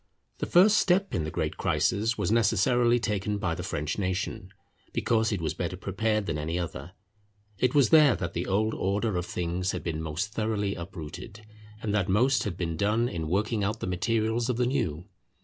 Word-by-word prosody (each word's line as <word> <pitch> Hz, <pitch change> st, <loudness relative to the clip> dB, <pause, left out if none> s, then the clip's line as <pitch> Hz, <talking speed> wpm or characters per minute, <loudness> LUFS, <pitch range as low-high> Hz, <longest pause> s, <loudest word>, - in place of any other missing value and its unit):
The -, -, -2 dB
first 200 Hz, +5 st, +6 dB
step 190 Hz, +2 st, +2 dB
in 80 Hz, -, 0 dB
the -, -, -3 dB
great -, -, -3 dB
crisis 115 Hz, +3 st, +1 dB
was -, -, 0 dB
necessarily 120 Hz, +2 st, +3 dB
taken 105 Hz, -2 st, -1 dB
by 95 Hz, -4 st, -1 dB
the 90 Hz, -, -5 dB
French 75 Hz, -1 st, -3 dB
nation, 95 Hz, -1 st, -2 dB, 0.4 s
because 110 Hz, -1 st, +1 dB
it 100 Hz, -, -1 dB
was 80 Hz, -, -1 dB
better 90 Hz, 0 st, -4 dB
prepared 105 Hz, +3 st, -1 dB
than 80 Hz, -4 st, -2 dB
any 80 Hz, +3 st, -2 dB
other. 90 Hz, +1 st, -5 dB, 0.7 s
It 125 Hz, +1 st, +1 dB
was 140 Hz, -3 st, +5 dB
there 150 Hz, -6 st, +7 dB
that 85 Hz, -, -4 dB
the 85 Hz, -, -3 dB
old 110 Hz, +3 st, +1 dB
order 100 Hz, +2 st, -1 dB
of 90 Hz, 0 st, -2 dB
things 90 Hz, +2 st, -2 dB
had -, -, -4 dB
been 80 Hz, -2 st, -3 dB
most 80 Hz, +7 st, -3 dB
thoroughly 105 Hz, -2 st, -1 dB
uprooted, 95 Hz, +5 st, -8 dB, 0.4 s
and 105 Hz, -, -1 dB
that 100 Hz, -2 st, +1 dB
most 125 Hz, +7 st, +3 dB
had 95 Hz, -4 st, -3 dB
been 85 Hz, -3 st, -2 dB
done 110 Hz, +6 st, +1 dB
in 80 Hz, -7 st, -4 dB
working 105 Hz, +3 st, 0 dB
out 105 Hz, +3 st, -1 dB
the -, -, -4 dB
materials 110 Hz, +5 st, 0 dB
of 125 Hz, -, 0 dB
the 125 Hz, -, +2 dB
new. 110 Hz, -, -1 dB
100 Hz, 195 wpm, -28 LUFS, 90-115 Hz, 0.7 s, there